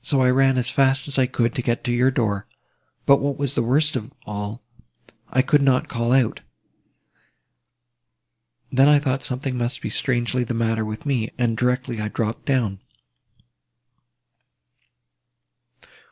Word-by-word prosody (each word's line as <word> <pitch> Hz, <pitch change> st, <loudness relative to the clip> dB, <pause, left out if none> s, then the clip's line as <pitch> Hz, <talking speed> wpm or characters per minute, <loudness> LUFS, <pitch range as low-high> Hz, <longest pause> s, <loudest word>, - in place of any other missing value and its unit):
I 130 Hz, -3 st, +4 dB
ran 135 Hz, 0 st, +3 dB
as 125 Hz, -1 st, 0 dB
fast 135 Hz, 0 st, +2 dB
as 140 Hz, -1 st, -2 dB
I 130 Hz, -, +3 dB
could, 120 Hz, -2 st, 0 dB
to 135 Hz, -, -2 dB
get 120 Hz, 0 st, -1 dB
to 120 Hz, -, -1 dB
your 125 Hz, +2 st, +3 dB
door; 110 Hz, -7 st, -1 dB, 0.6 s
but, 140 Hz, -, +6 dB
what 140 Hz, -1 st, -1 dB
was 140 Hz, -1 st, 0 dB
worst 140 Hz, +6 st, +2 dB
of 120 Hz, 0 st, -4 dB
all, 105 Hz, +3 st, -6 dB, 0.7 s
I 130 Hz, -, +2 dB
could 145 Hz, +1 st, +3 dB
not 135 Hz, -2 st, +2 dB
call 115 Hz, 0 st, -1 dB
out; 130 Hz, -3 st, +2 dB, 2.3 s
then 135 Hz, +2 st, +5 dB
I 150 Hz, -, +6 dB
thought 135 Hz, -2 st, -1 dB
something 130 Hz, 0 st, -4 dB
must 120 Hz, +2 st, -2 dB
be -, -, -5 dB
strangely 125 Hz, -1 st, 0 dB
the 120 Hz, 0 st, -4 dB
matter 115 Hz, -1 st, 0 dB
with 110 Hz, +3 st, -6 dB
me, 125 Hz, -6 st, 0 dB
and 120 Hz, -2 st, +1 dB
directly 125 Hz, -1 st, -1 dB
I 105 Hz, -, -2 dB
dropt 110 Hz, +1 st, -3 dB
down." 115 Hz, -8 st, 0 dB
125 Hz, 145 wpm, -22 LUFS, 115-135 Hz, 2.3 s, but